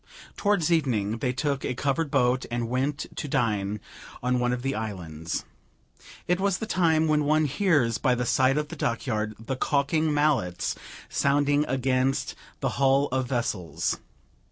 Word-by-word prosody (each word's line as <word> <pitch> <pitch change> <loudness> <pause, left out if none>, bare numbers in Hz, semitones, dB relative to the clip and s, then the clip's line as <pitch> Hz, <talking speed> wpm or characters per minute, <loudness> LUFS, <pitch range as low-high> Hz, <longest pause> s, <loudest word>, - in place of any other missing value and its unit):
Towards 200 -6 +1
evening 115 -9 +1
they 125 - 0
took 140 +2 -1
a 125 - -2
covered 145 +4 0
boat 130 -2 +2
and 120 -1 -2
went 135 +4 -1
to - - -4
dine 105 -5 0 0.4
on 125 0 +1
one 125 0 +1
of 125 0 -2
the 135 0 0
islands. 85 -8 -4 0.8
It 180 +1 +2
was 195 -1 +1
the 220 - -4
time 160 -6 +2
when 150 -1 +3
one 155 +1 +3
hears 145 - +2
by 125 -3 +2
the 125 0 -1
side 130 +3 +3
of 150 0 -1
the - - -6
dockyard 110 -2 -1
the 115 +4 -4
caulking 150 +4 +1
mallets 145 -12 +1 0.3
sounding 145 +1 +2
against 130 +1 0 0.3
the - - +1
hull 135 +1 +4
of 130 -1 0
vessels. 105 - -1
130 Hz, 155 wpm, -26 LUFS, 120-150 Hz, 0.8 s, hull